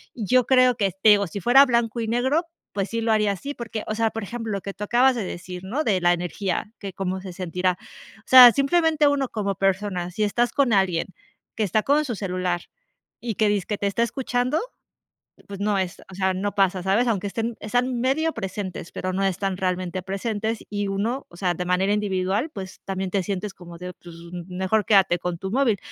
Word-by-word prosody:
yo 245 +2 +2
creo 255 -2 +5
que 200 -4 0
te 215 - +6
digo, 200 -2 +4
si 200 - -6
fuera 260 +8 +6
blanco 235 -2 0
y 225 - -2
negro, 260 +9 +1 0.3
pues 195 -1 -2
sí 230 0 -1
lo 225 0 +1
haría 210 -2 +3
así, 280 +10 -6
porque, 225 -2 -5
o 215 - -2
sea, 225 0 +1
por 225 -1 -5
ejemplo, 225 +1 -5
lo 195 - -3
que 200 - -6
tú 210 - -6
acabas 250 +4 +3
de 225 - -2
decir, 180 +1 -7
¿no?, 270 +11 -1
de 195 -7 +2
la 175 0 +4
energía, 180 +4 -3
que 195 -2 -7
cómo 190 -1 -3
se 185 -2 -8
sentirá, 180 0 -1 0.4
o - - -22
sea, 250 -2 +11
simplemente 305 +1 +3
uno 280 -2 +1
como 200 -4 -2
persona, 190 -2 -1
si 210 +4 -1
estás 240 +4 +1
con 275 -4 +2
alguien 190 -4 +2 0.5
que 220 - 0
está 210 +2 +1
con 295 +2 +2
su 240 -4 -3
celular 180 -3 -2 0.6
y 230 -4 -3
que 215 -1 +2
dizque 205 0 -1
te 200 - -1
está 230 +4 +1
escuchando, 250 +4 -1 0.9
pues 200 -1 -8
no 205 -1 +1
es, 185 0 -3
o - - -10
sea, 190 0 0
no 200 +2 -2
pasa, 190 -2 +2
¿sabes?, 210 +6 +2
aunque 205 -3 0
estén, 225 +2 -3
están 245 +3 0
medio 315 +6 +1
presentes, 190 -4 -5
pero 185 0 -3
no 195 +1 0
están 195 0 -1
realmente 185 -1 -2
presentes, 215 +3 -2
y 205 -1 -2
uno, 225 +8 -2
o 170 - -14
sea, 180 -1 0
de 180 - -4
manera 185 +3 +1
individual, 200 - -1
pues, 190 -5 -8
también 190 -1 -3
te 195 -1 0
sientes 200 0 -4
como 170 -1 -12
de, 180 0 -7
pues, 170 -1 -13 0.2
m 175 - -6
mejor 190 +3 0
quédate 195 -4 +4
con 175 0 -4
tu 190 +2 -5
móvil, 235 -4 +2
205 Hz, 215 wpm, -24 LUFS, 185-235 Hz, 0.9 s, sea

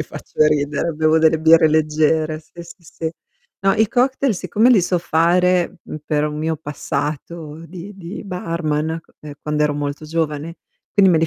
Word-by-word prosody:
quindi - - +1
faccio - - -1
ridere, 150 +2 0
bevo 155 +1 +3
delle 160 0 +4
birre 160 0 +6
leggere, 155 0 +1
sì, 170 +2 -12
sì, 170 +1 -14
sì. 160 0 -5 0.5
No, 195 0 +4
i 220 -1 +2
cocktail 260 0 +1
siccome 215 +5 +2
li 230 -6 +6
so 180 0 +1
fare, 175 +2 +2
mhmm, - - -7
per 150 -1 0
un 150 0 -4
mio 160 +1 -1
passato 150 +2 -5
di 185 +4 -9
di 180 +2 -8
barman, 165 -4 -2
q - - -39
ehm, 150 -1 -9
quando 150 0 -1
ero 150 -1 +1
molto 145 +1 -4
giovane, 160 0 -3 0.4
quindi 195 -2 +5
me 165 - +4
li 165 - +2
160 Hz, 180 wpm, -20 LUFS, 150-175 Hz, 0.5 s, birre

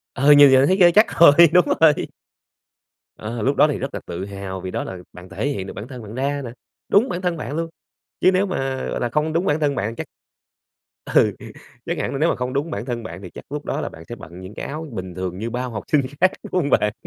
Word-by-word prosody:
Ờ, 140 +3 +4
như 145 0 +9
giờ 130 0 +5
thấy 185 - +3
ghê, 175 -3 +6
chắc 215 +6 +3
rồi, 165 -4 +9 0.2
đúng 180 0 +6 0.2
rồi. 155 -2 +4 1.1
Ờ, 115 +2 -5
lúc 135 +5 +1
đó - - +5
thì 145 - -2
rất 135 +1 -5
là - - -4
tự 90 +3 -5
hào 100 -1 -7
vì 95 - -6
đó - - -3
là 95 - -7 0.2
bạn 90 +1 -12
thể 100 +8 -3
hiện 100 -10 -3
được - - -7
bản 105 - -8
thân 125 -2 -9
bạn 105 +1 -9
ra 140 +2 -1
nè. 120 - -6 0.4
Đúng 225 +6 +4
bản 175 - -3
thân 175 -2 -1
bạn 150 -1 -5
luôn! 165 +1 -2 0.5
Chứ 185 - +5
nếu 190 +2 +2
mà, 135 -8 -3
gọi - - -3
là, 120 - -1
không 150 +5 -1
đúng 170 +3 0
bản 150 -2 +1
thân 145 -2 0
bạn 110 +3 -3
chắc 160 - -6 1.1
ừ, - - +5 0.5
chắc - - -2
hẳn - - -2
là 140 - -3
nếu 165 +3 +3
mà - - 0
không 125 +1 -4
đúng 145 +4 -2
bản 115 - -4
thân 120 -2 -4
bạn 90 -4 -8
thì 95 - -9
chắc - - -12
lúc 150 0 -5
đó - - -2
là - - -4
bạn 80 - -13
sẽ 120 - -5
bận 90 -5 -12
những 95 +3 -10
cái - - -6
áo 155 +3 -6
bình 95 -5 -7
thường 90 -1 -4
như 110 +4 -4
bao 125 +2 -3
học 110 -2 -5
sinh 150 - +4 0.2
khác, 185 0 +5
đúng - - -10
hông 145 - -2
bạn? 105 -5 +2
135 Hz, 270 wpm, -21 LUFS, 105-155 Hz, 1.1 s, như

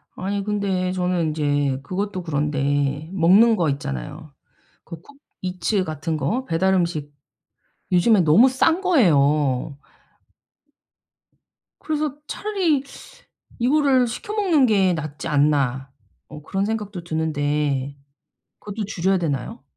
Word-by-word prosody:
아니 200 +2 -3
근데 195 -3 -1
저는 180 -2 0
인제 145 -3 0
그것도 185 +2 -4
그런데 145 -1 -1
먹는 195 +6 +5
거 170 -7 +1
있잖아요. 145 +2 -5 0.5
그거 165 -1 -10 0.4
쿠팡이츠 185 +2 -1
같은 155 0 -3
거 195 - -2
배달 190 +1 +1
음식. 170 -5 -1 0.8
요즘에 185 +3 +4
너무 180 +11 +5
싼 320 +7 +2
거예요. 150 - +2 2.0
그래서 305 -3 -2
차라리 370 -10 -1 0.8
'이거를 265 0 +3
시켜 415 - -6
먹는 365 -10 +3
게 195 -5 +3
낫지 155 -3 -5
않나.' 140 -3 +1 0.4
어 150 - -11
그런 195 +5 -2
생각도 210 -4 -4
드는데 145 -4 -1 0.6
그것도 210 +1 -5
줄여야 190 0 0
되나요? 145 -8 -4
175 Hz, 240 characters per minute, -22 LUFS, 145-210 Hz, 2.0 s, 먹는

